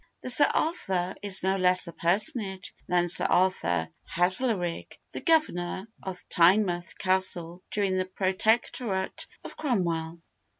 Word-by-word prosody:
The 255 Hz, -, 0 dB
'Sir 290 Hz, -, +7 dB
Arthur' 190 Hz, -, -1 dB
is 200 Hz, -3 st, -1 dB
no 190 Hz, +1 st, +1 dB
less 185 Hz, 0 st, +3 dB
a 170 Hz, -, -8 dB
personage 190 Hz, +2 st, -1 dB
than 175 Hz, 0 st, +2 dB
Sir 165 Hz, -1 st, +1 dB
Arthur 130 Hz, -, +1 dB, 0.2 s
Haslerigg, 180 Hz, 0 st, 0 dB
the -, -, -6 dB
Governor 200 Hz, -, +1 dB
of 185 Hz, -1 st, -7 dB
Tynemouth 175 Hz, 0 st, +2 dB
Castle 185 Hz, -2 st, -1 dB
during 195 Hz, -3 st, 0 dB
the 185 Hz, -, 0 dB
Protectorate 190 Hz, +2 st, -1 dB, 0.2 s
of -, -, -8 dB
Cromwell. 170 Hz, -, -1 dB
185 Hz, 125 wpm, -27 LUFS, 175-200 Hz, 0.2 s, Sir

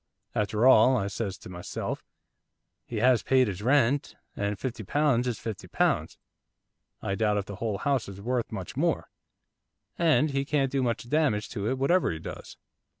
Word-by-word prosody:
"After 105 Hz, +2 st, +1 dB
all," 130 Hz, 0 st, +7 dB
I 100 Hz, -, -1 dB
says 100 Hz, -1 st, -3 dB
to -, -, -12 dB
myself, 90 Hz, -1 st, -5 dB, 0.8 s
"he 120 Hz, -, -6 dB
has 125 Hz, +1 st, +4 dB
paid 130 Hz, -2 st, +3 dB
his 100 Hz, -1 st, -4 dB
rent, 135 Hz, +2 st, +2 dB, 0.2 s
and 100 Hz, 0 st, -2 dB
fifty 120 Hz, -2 st, -4 dB
pounds 130 Hz, +1 st, +2 dB
is 120 Hz, -4 st, -1 dB
fifty 110 Hz, -3 st, -6 dB
pounds, -, -, 0 dB, 0.9 s
I 100 Hz, -, -1 dB
doubt 105 Hz, 0 st, +1 dB
if 100 Hz, -, -1 dB
the 100 Hz, -1 st, -8 dB
whole 110 Hz, -3 st, -2 dB
house 135 Hz, 0 st, 0 dB
is 100 Hz, 0 st, -9 dB
worth 120 Hz, +3 st, -2 dB
much -, -, -6 dB
more, -, -, 0 dB, 0.9 s
and 155 Hz, -3 st, +3 dB
he 135 Hz, 0 st, 0 dB
can't 140 Hz, -2 st, 0 dB
do 135 Hz, -, +1 dB
much 120 Hz, -1 st, -1 dB
damage 135 Hz, -7 st, +1 dB
to 105 Hz, -2 st, -3 dB
it 130 Hz, -, -1 dB
whatever 170 Hz, +7 st, +2 dB
he 80 Hz, -, -4 dB
does." 80 Hz, -, -9 dB
120 Hz, 175 wpm, -28 LUFS, 105-135 Hz, 0.9 s, all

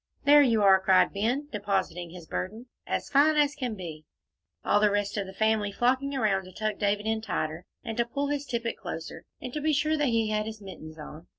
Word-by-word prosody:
"There 290 Hz, +1 st, +8 dB
you 230 Hz, -6 st, +3 dB
are!" 190 Hz, -1 st, +7 dB
cried 190 Hz, -1 st, +4 dB
Ben, 240 Hz, +8 st, -1 dB
depositing 190 Hz, -4 st, -2 dB
his 175 Hz, -1 st, -11 dB
burden, 215 Hz, +9 st, -5 dB, 0.2 s
"as -, -, -2 dB
fine 295 Hz, +3 st, +4 dB
as 295 Hz, -1 st, +3 dB
can 250 Hz, -5 st, -3 dB
be," 165 Hz, -5 st, -8 dB, 0.6 s
all 205 Hz, -, +4 dB
the 210 Hz, 0 st, +4 dB
rest 205 Hz, 0 st, -1 dB
of 200 Hz, -2 st, -2 dB
the -, -, -7 dB
family 220 Hz, -1 st, +1 dB
flocking 260 Hz, +5 st, +1 dB
around 200 Hz, -6 st, +1 dB
to 185 Hz, -, -12 dB
tuck 215 Hz, +2 st, -3 dB
David 205 Hz, 0 st, 0 dB
in 220 Hz, 0 st, 0 dB
tighter, 160 Hz, -6 st, -3 dB, 0.2 s
and 225 Hz, -, -4 dB
to 235 Hz, -, +2 dB
pull 280 Hz, +4 st, -2 dB
his 290 Hz, -1 st, -2 dB
tippet 235 Hz, -2 st, -2 dB
closer, 165 Hz, -3 st, -7 dB
and 250 Hz, -1 st, -7 dB
to 300 Hz, -, -3 dB
be 310 Hz, +1 st, +1 dB
sure 305 Hz, +2 st, +1 dB
that 295 Hz, -, +1 dB
he 225 Hz, -2 st, +1 dB
had 215 Hz, 0 st, 0 dB
his 220 Hz, -1 st, -7 dB
mittens 160 Hz, -6 st, -10 dB
on. 155 Hz, +2 st, -10 dB
215 Hz, 220 wpm, -28 LUFS, 190-255 Hz, 0.6 s, There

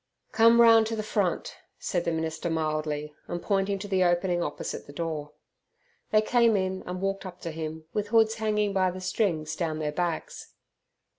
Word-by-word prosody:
"Come 230 Hz, +1 st, +6 dB
round 225 Hz, -1 st, +7 dB
to 225 Hz, -, -2 dB
the 215 Hz, -, -3 dB
front," 200 Hz, -4 st, -1 dB, 0.2 s
said 175 Hz, -2 st, -2 dB
the 170 Hz, -, +1 dB
minister 160 Hz, +1 st, -2 dB
mildly, 155 Hz, -2 st, -2 dB
and 175 Hz, -, -3 dB
pointing 195 Hz, +1 st, 0 dB
to 200 Hz, +1 st, -7 dB
the 190 Hz, -2 st, +2 dB
opening 175 Hz, 0 st, +2 dB
opposite 150 Hz, -3 st, -4 dB
the -, -, -9 dB
door. 150 Hz, -2 st, -4 dB, 0.8 s
They 215 Hz, 0 st, +4 dB
came 235 Hz, -2 st, +4 dB
in 190 Hz, 0 st, -1 dB
and 180 Hz, 0 st, -4 dB
walked 195 Hz, 0 st, -1 dB
up 185 Hz, -2 st, -9 dB
to 165 Hz, -, -4 dB
him, 160 Hz, 0 st, -6 dB
with 210 Hz, -1 st, -1 dB
hoods 220 Hz, 0 st, +4 dB
hanging 210 Hz, -2 st, 0 dB
by 185 Hz, -1 st, +2 dB
the 185 Hz, +1 st, -6 dB
strings 175 Hz, -5 st, -1 dB
down 160 Hz, -3 st, -2 dB
their 150 Hz, -1 st, -2 dB
backs. 170 Hz, 0 st, -4 dB
185 Hz, 180 wpm, -27 LUFS, 160-210 Hz, 0.8 s, round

